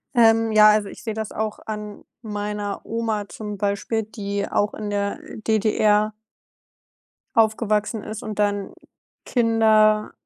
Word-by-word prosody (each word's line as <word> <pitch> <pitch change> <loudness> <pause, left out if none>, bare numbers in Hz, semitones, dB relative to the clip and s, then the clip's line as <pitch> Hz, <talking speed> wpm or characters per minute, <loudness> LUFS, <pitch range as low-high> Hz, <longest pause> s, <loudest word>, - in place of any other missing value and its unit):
Ähm, 225 -1 +5
ja, 215 0 +7
also, 210 -2 +1
ich - - -12
sehe 220 - -3
das 220 -1 -4
auch 215 0 -3
an 210 -1 -6 0.2
meiner 210 -2 -4
Oma 220 -3 -2
zum 210 -2 -6
Beispiel, 205 +3 -1
die 200 -2 -4
auch 205 0 0
in 210 -1 -5
der 200 0 -2 0.3
DDR 215 -1 +2 1.2
Aufgewachsen 215 -1 +1
ist 215 +3 -7
und 215 -2 -6
dann 205 -1 0 0.5
Kinder 220 -3 +3
215 Hz, 130 wpm, -23 LUFS, 205-220 Hz, 1.2 s, ja